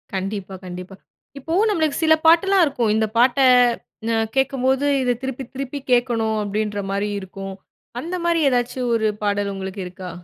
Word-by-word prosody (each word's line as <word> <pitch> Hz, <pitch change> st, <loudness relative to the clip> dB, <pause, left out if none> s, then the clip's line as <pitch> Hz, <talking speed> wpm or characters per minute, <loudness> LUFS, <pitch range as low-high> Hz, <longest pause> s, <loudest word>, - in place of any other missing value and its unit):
கண்டிப்பா. 195 Hz, 0 st, -4 dB
கண்டிப்பா. 180 Hz, +1 st, -8 dB, 0.4 s
இப்போ 320 Hz, +5 st, -5 dB, 0.2 s
நம்மளுக்கு 315 Hz, -7 st, 0 dB
சில 315 Hz, 0 st, +6 dB
பாட்டெல்லாம் 355 Hz, +3 st, +5 dB
இருக்கும். 240 Hz, -6 st, 0 dB
இந்த 220 Hz, 0 st, +1 dB
பாட்ட 250 Hz, +2 st, +4 dB, 0.8 s
அ, -, -, +2 dB, 0.2 s
கேக்கும்போது, 265 Hz, +1 st, +1 dB, 0.2 s
இத 250 Hz, -, +2 dB
திருப்பி 265 Hz, 0 st, -4 dB
திருப்பி 275 Hz, +1 st, -5 dB
கேக்கணும் 235 Hz, -3 st, +2 dB
அப்டின்ற 210 Hz, 0 st, -2 dB
மாரி 200 Hz, +1 st, -1 dB
இருக்கும். 195 Hz, 0 st, -8 dB, 0.5 s
அந்த 340 Hz, +6 st, -4 dB
மாரி 340 Hz, -1 st, +2 dB
ஏதாச்சும் 245 Hz, 0 st, -1 dB
ஒரு 220 Hz, -1 st, +1 dB, 0.2 s
பாடல் 205 Hz, 0 st, 0 dB
உங்களுக்கு 190 Hz, +1 st, -6 dB
இருக்கா? 185 Hz, 0 st, -8 dB
235 Hz, 145 wpm, -21 LUFS, 200-270 Hz, 0.8 s, சில